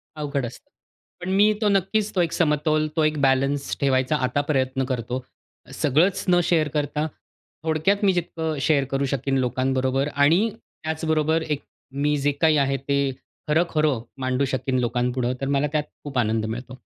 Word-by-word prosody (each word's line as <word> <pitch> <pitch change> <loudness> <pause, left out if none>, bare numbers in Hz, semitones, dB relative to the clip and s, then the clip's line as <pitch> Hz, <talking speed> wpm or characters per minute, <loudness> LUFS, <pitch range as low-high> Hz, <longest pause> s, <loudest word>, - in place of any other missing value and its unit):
अवघड 145 -3 -2
असतं. 120 - -10 0.5
पण 180 - -4
मी 210 +2 +5
तो 210 - +3
नक्कीच 200 +2 +1
तो 180 - +3
एक 170 - 0
समतोल 155 -1 +2
तो 160 - +2
एक 155 0 +1
बॅलन्स 135 +1 +1
ठेवायचा 130 +1 +2
आता 130 +3 0
प्रयत्न 130 -1 0
करतो. 125 0 -3 0.5
सगळंच 160 +7 +2
न 175 -1 +5
शेअर 160 -3 +2
करता 150 +1 -1 0.6
थोडक्यात 165 +6 +1
मी 195 - +4
जितकं 160 -3 -2
शेअर 145 -1 +3
करू 135 0 +1
शकीन 135 0 -1
लोकांबरोबर 130 +1 0
आणि 165 +10 +4
त्याचबरोबर 160 -1 -1
एक 150 -3 -2 0.3
मी 145 +2 0
जे 145 +1 +1
काही 160 -2 +5
आहे, 135 -1 +2
ते 140 0 0 0.4
खरं-खरं 155 -5 +1 0.2
मांडू 130 +1 +1
शकीन 130 -1 -1
लोकांपुढं, 125 +1 0
तर 135 - -1
मला 140 +1 +1
त्यात 150 -1 +1 0.2
खूप 140 -3 -5
आनंद 110 -1 +1
मिळतो. 125 +3 -6
145 Hz, 160 wpm, -24 LUFS, 130-160 Hz, 0.6 s, मी